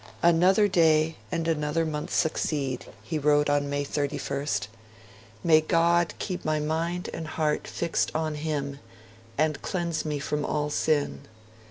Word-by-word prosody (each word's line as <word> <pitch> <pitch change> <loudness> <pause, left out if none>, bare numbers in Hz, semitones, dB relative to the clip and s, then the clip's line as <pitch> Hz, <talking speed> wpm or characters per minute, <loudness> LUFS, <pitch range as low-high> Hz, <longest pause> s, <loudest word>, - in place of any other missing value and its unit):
'Another 180 +5 +5
day 160 -3 +3 0.2
and 165 -2 -1
another 160 0 0
month 150 -1 -4
succeed', 140 -4 0 0.2
he 160 -2 -2
wrote 145 0 +3
on 145 0 +1
May 145 0 -1
31st. 145 0 -2 0.8
'May 155 -2 +6
God 170 +1 +2
keep 185 -3 -4
my 155 0 +1
mind 165 +4 -1
and 160 -1 -5
heart 155 -1 -1
fixed 170 -1 -1
on 155 -1 0
Him, 145 -2 -3 0.6
and 155 -1 +1
cleanse 170 -4 -2
me 150 -2 -2
from 150 +1 -2
all 150 0 -1
sin. 150 -1 0
155 Hz, 140 wpm, -27 LUFS, 150-165 Hz, 0.8 s, May